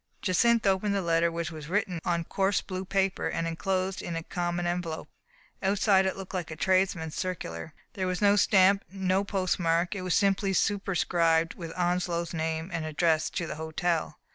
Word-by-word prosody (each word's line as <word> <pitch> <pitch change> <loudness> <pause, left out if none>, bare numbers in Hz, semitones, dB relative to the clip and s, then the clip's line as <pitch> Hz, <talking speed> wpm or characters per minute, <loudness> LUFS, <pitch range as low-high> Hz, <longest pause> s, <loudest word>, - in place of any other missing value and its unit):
Jacynth 230 +5 +3
opened 195 +1 +2
the 200 - +1
letter, 170 0 +2
which 170 0 -3
was 155 -2 -8
written 185 -2 0
on 170 -1 0
coarse 195 +4 +1
blue 185 -1 -5
paper, 195 0 0
and 165 - -2
inclosed 185 +3 -1
in 170 - -4
a 165 - -3
common 175 0 -2
envelope. 175 -2 -3 0.5
Outside 195 0 +3
it 190 - -2
looked 195 0 -8
like 180 -2 -3
a 160 - -6
tradesman's 185 -2 +1
circular. 160 - -5 0.2
There 185 -1 -2
was 185 -1 -1
no 205 -1 +5
stamp, 195 0 +4
no 190 0 +1
postmark; 180 -3 0
it 200 - -5
was 185 -2 0
simply 195 0 +2
superscribed 170 -5 +1
with 165 -2 -7
Onslow's 175 -1 0
name, 160 +2 -2
and 165 -2 -2
addressed 155 0 +1
to 170 - -1
the 155 - -6
hotel. 160 0 -1
180 Hz, 175 wpm, -28 LUFS, 165-195 Hz, 0.5 s, no